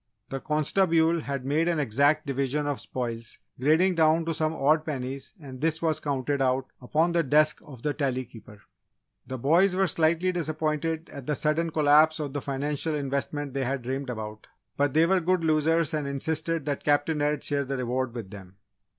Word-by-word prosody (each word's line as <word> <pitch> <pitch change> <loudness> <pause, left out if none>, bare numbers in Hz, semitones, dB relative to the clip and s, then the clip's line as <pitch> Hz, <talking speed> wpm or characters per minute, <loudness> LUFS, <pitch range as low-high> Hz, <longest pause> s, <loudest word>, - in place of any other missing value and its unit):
"The 135 - -4
constabule" 165 +2 +2
had 140 -3 -4
made 155 +5 +1
an 170 -2 +1
exact 145 +5 +2
division 140 +1 -1
of 145 -2 -2
spoils 115 -3 -5 0.2
grading 160 +8 +3
down 160 0 +3
to 165 - -1
some 155 0 0
odd 155 +2 +3
pennies, 135 +1 -5
and 135 -4 -10
this 160 0 +1
was 160 -2 0
counted 140 0 -1
out 130 0 +1 0.2
upon 155 +7 +1
the 170 0 +2
desk 155 +1 +3
of 130 -6 -13
the 150 - 0
Tally 130 -3 -1
Keeper. 105 -4 -15 0.6
The 130 - -4
boys 170 +9 +3
were 195 +1 +3
slightly 170 +2 +1
disappointed 160 -1 -2
at 140 -3 -9
the 150 - 0
sudden 155 +3 0
collapse 155 +1 +4
of 145 -3 -4
the 145 - -3
financial 145 +3 -2
investments 140 0 -3
they 135 -1 -1
had 130 0 -2
dreamed 135 +2 -3
about, 110 -2 -6 0.3
but 145 0 0
they 160 +1 +6
were 190 +2 +3
good 180 0 +1
losers 160 +1 +2
and 150 -2 -1
insisted 160 +2 -2
that 145 -2 -2
Captain 145 +1 +1
Ed 150 0 0
share 145 -1 0
the 135 0 -3
reward 125 0 -2
with 110 -5 -7
them. 95 -2 -11
145 Hz, 185 wpm, -27 LUFS, 135-160 Hz, 0.6 s, they